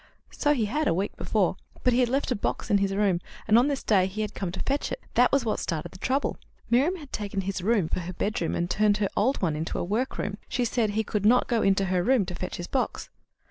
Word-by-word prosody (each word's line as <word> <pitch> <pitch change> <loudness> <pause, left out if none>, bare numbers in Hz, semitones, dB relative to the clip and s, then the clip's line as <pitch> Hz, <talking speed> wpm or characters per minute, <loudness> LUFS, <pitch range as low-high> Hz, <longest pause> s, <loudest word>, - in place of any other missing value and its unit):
"So 295 0 +1
he 230 -5 +1
had, 295 +9 0
a - - +2
week 195 +3 -2
before; 195 -4 0 0.3
but 250 - +4
he 245 - +3
had 245 -2 +3
left 270 +1 0
a - - +2
box 210 - -3
in 200 - +5
his 195 0 0
room, 195 -4 +2 0.3
and 215 - +5
on 245 +4 +6
this 280 -2 -2
day 190 -4 +3
he 205 +3 -4
had 210 -1 -3
come 185 -3 -3
to 185 - -6
fetch 280 +1 -1
it. - - -3
That 245 +1 +4
was 275 -3 +2
what 220 - 0
started 165 -1 -3
the 185 - -13
trouble. 265 +7 0 0.3
Miriam 280 +10 +3
had 295 -7 -11
taken 200 -2 -2
his 190 0 -3
room 205 -3 +2
for - - -2
her 180 +1 -5
bedroom, 190 -2 -1
and 170 - 0
turned 210 +2 +2
her 205 -2 0
old 245 +2 +1
one 160 -4 +1
into 160 +2 -3
a - - -1
workroom. 205 +1 -2
She 245 0 0
said 230 -2 +1
he 215 +2 -1
should 210 -2 0
not 240 +4 +4
go 225 -4 +3
to 195 0 +1
her 185 -1 +1
room 245 +1 +3
to 180 - -6
fetch 180 +1 -5
his 175 - -5
box." 260 - -2
210 Hz, 265 wpm, -27 LUFS, 190-245 Hz, 0.3 s, on